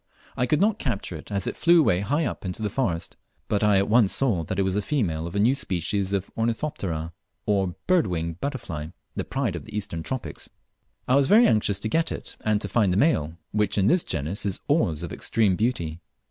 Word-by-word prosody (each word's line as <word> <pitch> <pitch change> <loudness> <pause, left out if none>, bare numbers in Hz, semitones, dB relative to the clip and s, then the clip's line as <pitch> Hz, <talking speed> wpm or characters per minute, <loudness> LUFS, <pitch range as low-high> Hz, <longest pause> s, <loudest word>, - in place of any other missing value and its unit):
I 125 - 0
could 150 - +2
not 210 +2 +2
capture 100 - -3
it 80 - -10
as 100 -2 -1
it - - -3
flew 170 +1 +5
away 90 - +3
high 145 +11 0
up - - -4
into 95 +3 -4
the 105 - -1
forest, 90 -11 -2 0.3
but 105 0 0
I 105 -2 +5
at 100 - +2
once 110 -2 +4
saw 115 -11 +2
that 95 - -4
it 100 - +2
was 95 0 0
a 105 - +1
female 90 - -1
of 85 - -8
a - - +1
new 115 +6 +4
species 100 - -1
of 100 -1 -2
Ornithoptera 100 - -2 0.3
or 95 -3 +1
"bird 180 - +3
winged 85 -1 -3
butterfly," 100 - -4 0.3
the - - -2
pride 125 -8 -2
of 85 - -7
the 110 -1 -6
Eastern 90 -5 -3
tropics. 130 +8 -5 0.6
I 130 - +4
was 140 -1 +4
very 225 +7 +7
anxious 105 - +2
to 110 - -1
get 165 +8 +1
it - - -6
and 105 -1 +2
to - - -2
find 105 -6 +2
the 90 - +1
male, 85 - +2
which 105 -1 +1
in 95 - +3
this 175 - +4
genus 80 +6 -3
is 100 -2 -2
always 90 - +1
of 85 - -5
extreme 105 -5 +1
beauty. 85 -8 -1
100 Hz, 225 wpm, -25 LUFS, 90-125 Hz, 0.6 s, very